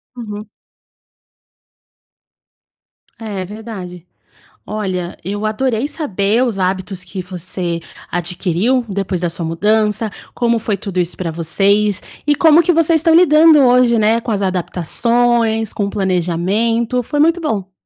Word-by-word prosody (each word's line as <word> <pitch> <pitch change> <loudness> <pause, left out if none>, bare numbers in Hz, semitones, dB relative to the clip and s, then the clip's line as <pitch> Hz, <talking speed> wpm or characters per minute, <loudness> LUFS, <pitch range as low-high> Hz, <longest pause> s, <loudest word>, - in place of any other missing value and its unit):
Uhum. 210 -3 -7 2.7
É, 200 -4 -5
verdade. 190 -4 -8 0.6
Olha, 185 -4 -3
eu 205 +3 -4
adorei 230 +3 0
saber 225 - 0
os 230 -5 -2
hábitos 185 0 -2
que 190 - -6
você 180 -1 -5 0.3
adquiriu, 180 +8 0
depois 195 -2 -2
da 175 - 0
sua 165 0 -6
mudança. 210 +5 +1 0.2
Como 235 -1 +1
foi 210 -2 -1
tudo 190 -1 -3
isso 175 0 -3
para 175 -3 -3
vocês, 200 +5 +1 0.3
e 295 - +4
como 320 +1 +6
que 355 - +2
vocês 330 0 +3
estão 325 +1 +3
lidando 320 -2 +6
hoje, 245 -2 +4
né, 220 +2 +3
com 230 - -5
as 205 - 0
adaptações, 225 +5 0
com 205 - -2
o - - -4
planejamento. 200 +6 0
Foi 290 +5 -3
muito 330 +3 +3
bom. 200 - -3
210 Hz, 130 wpm, -17 LUFS, 185-240 Hz, 2.7 s, como